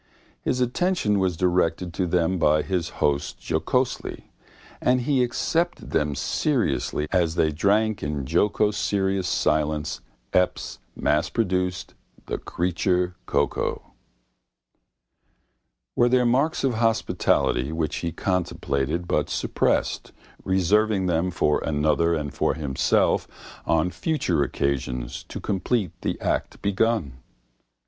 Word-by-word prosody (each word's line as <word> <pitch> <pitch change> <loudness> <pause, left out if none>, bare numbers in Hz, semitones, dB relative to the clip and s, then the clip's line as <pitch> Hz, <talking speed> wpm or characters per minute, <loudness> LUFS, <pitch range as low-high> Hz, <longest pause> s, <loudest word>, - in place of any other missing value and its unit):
His 125 - -1
attention 125 - +1
was 95 -3 0
directed 90 -1 +1
to 90 +1 -1
them 90 +1 +1
by 75 -1 +3
his 90 -4 -1 0.2
host 70 -1 -1
jocosely, - - -1 0.5
and 125 0 +3
he 130 +1 +2
accepted 165 +8 -1
them 75 -1 +1
seriously 75 - 0
as 85 -3 +2
they 80 -2 +2
drank 105 +7 +1
in 75 -2 -3
jocoserious 95 +2 +1
silence 75 -6 0 0.3
Epps's 90 0 0 0.2
massproduct, 90 -4 0 0.3
the - - -3
creature 90 +1 0
cocoa. - - -1 2.0
Were 120 0 +4
there 125 0 +3
marks 135 +7 +2
of 135 -2 +2
hospitality 110 - +1
which 80 -1 -2
he 85 - -2
contemplated 85 -3 -1
but - - 0
suppressed, - - 0 0.3
reserving 95 +2 +2
them 85 0 +1
for 75 -4 +1
another 80 +2 +2
and 75 -3 -4
for - - 0
himself 70 -4 +1 0.4
on 85 +2 +2
future 125 - 0
occasions 65 -3 -2
to - - -7
complete 100 -1 -1
the - - -2
act - - -1
begun? 100 - 0
90 Hz, 110 wpm, -24 LUFS, 75-105 Hz, 2.0 s, Were